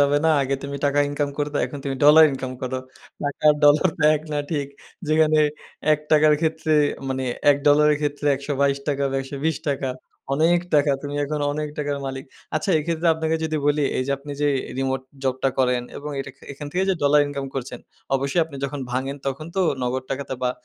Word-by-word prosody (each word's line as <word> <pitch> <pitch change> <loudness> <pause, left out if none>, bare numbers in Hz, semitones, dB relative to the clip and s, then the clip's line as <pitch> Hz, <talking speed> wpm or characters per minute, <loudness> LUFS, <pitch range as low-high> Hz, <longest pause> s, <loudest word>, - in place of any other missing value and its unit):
যাবে 145 0 +4
না। 160 - +5
আগে 135 0 0
তুমি 140 0 -5
টাকা 145 0 +1
ইনকাম 145 0 -1
করতো, 145 0 -1
এখন 140 +3 -8
তুমি 135 -1 -2
ডলার 155 +2 +9
ইনকাম 130 -1 -4
করো। 130 0 -2 0.4
টাকা 145 0 -4
আর - - +3
ডলার 150 +5 +6
তো - - -14
প্যাক 150 0 +4
না 150 - 0
ঠিক। 145 -4 -1 0.4
যেখানে 155 0 +4 0.5
১২ 150 - +2
টাকার 155 0 +6
ক্ষেত্রে 160 -1 0 0.4
মানে 130 0 -2 0.3
$১ 140 - +4
ডলারের 150 +1 +5
ক্ষেত্রে 145 0 -2
১২২ 140 0 0
টাকা 140 -1 0
বা - - -4
১২০ 140 +3 -2 0.8
অনেক 170 +4 +3
টাকা। 145 -1 +4
তুমি 145 0 -5
এখন 150 +1 -3
অনেক 150 +1 -3
টাকার 145 -1 -1
মালিক। 135 0 -5 0.3
আচ্ছা 170 +5 -1
এক্ষেত্রে 165 +2 -2
আপনাকে 160 0 -1
যদি 155 -1 -1
বলি, 145 0 +2 0.2
এই - - +1
যে - - -2
আপনি 145 +1 -8
যে 145 - +3 0.3
রিমোট 135 -1 -1 0.2
জবটা 130 +1 +1
করেন 125 -1 +2
এবং 150 +1 -6
এটা 135 - -6
খে - - -18
এখান 145 +1 -8
থেকে 185 +2 +1
যে - - +2
ডলার 145 +1 +5
ইনকাম 140 -1 -4
করছেন। 125 -2 -5 0.4
অবশ্যই 140 +5 0
আপনি 155 -3 -10
যখন 140 +1 -4
ভাঙেন 135 +2 -2
তখন 140 +3 -3
তো - - +2 0.2
নগদ 125 +1 -1
টাকাতে 135 -1 -3
বা 125 - +2
145 Hz, 200 wpm, -23 LUFS, 135-150 Hz, 0.8 s, ডলার